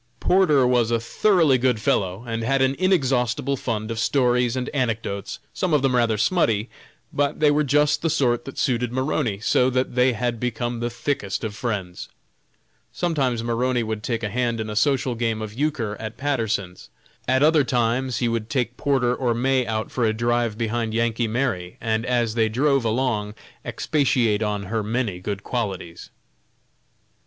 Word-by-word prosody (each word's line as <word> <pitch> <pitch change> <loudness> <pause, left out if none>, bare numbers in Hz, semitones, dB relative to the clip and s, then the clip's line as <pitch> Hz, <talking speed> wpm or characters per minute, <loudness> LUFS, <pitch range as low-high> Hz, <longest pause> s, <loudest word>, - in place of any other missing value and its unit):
Porter 165 -8 +4
was 120 -2 +2
a 115 -1 +1
thoroughly 155 - +3
good 125 -3 +1
fellow, 95 0 0
and 115 -1 -3
had 135 +3 +2
an 130 +1 +1
inexhaustible 140 - +1
fund 115 -3 -3
of 115 - -3
stories 125 -1 +2
and 125 -1 -2
anecdotes, 115 -7 -2 0.2
some 180 -5 0
of 140 - +1
them 130 -2 +2
rather 115 -3 +2
"smutty," 115 - +1 0.4
but 145 0 0
they 150 -1 +4
were 150 +1 +2
just 150 +1 +2
the 165 - 0
sort 120 -6 +1
that 135 - -9
suited 125 -3 0
Maroney, 125 -5 -1
so 125 +3 +2
that 130 0 -1
they 125 +1 +3
had 120 +1 -2
become 120 0 -2
the 120 0 -1
thickest 120 -4 -3
of 110 -2 -3
friends. 105 -7 -4 0.8
Sometimes 135 -9 -1
Maroney 120 +1 0
would 110 -1 -4
take 115 +1 -3
a 105 - -1
hand 120 +1 -1
in 110 -1 -3
a - - -5
social 130 +1 +1
game 115 -2 -1
of 110 -1 -6
euchre 130 -5 -1
at 110 +1 -6
Patterson's, 110 -9 -2 0.4
at 130 +2 +3
other 155 -1 +5
times 125 0 0
he 120 - 0
would 115 -1 -2
take 125 -3 -1
Porter 130 -4 +1
or 125 -3 0
May 130 +1 +1
out 110 0 -2
for 125 - -1
a 110 -1 +2
drive 120 -1 0
behind 115 -1 -2
"Yankee 115 0 0
Mary," 110 -7 -2
and 110 +1 -1
as 120 -3 +1
they 110 -1 +2
drove 135 +3 +2
along 110 -3 -1 0.3
expatiate 125 -8 +1
on 105 -2 -1
her 110 +3 -2
many 105 -3 -2
good 100 +1 -5
qualities. 95 -8 -4
120 Hz, 175 wpm, -23 LUFS, 110-130 Hz, 0.8 s, other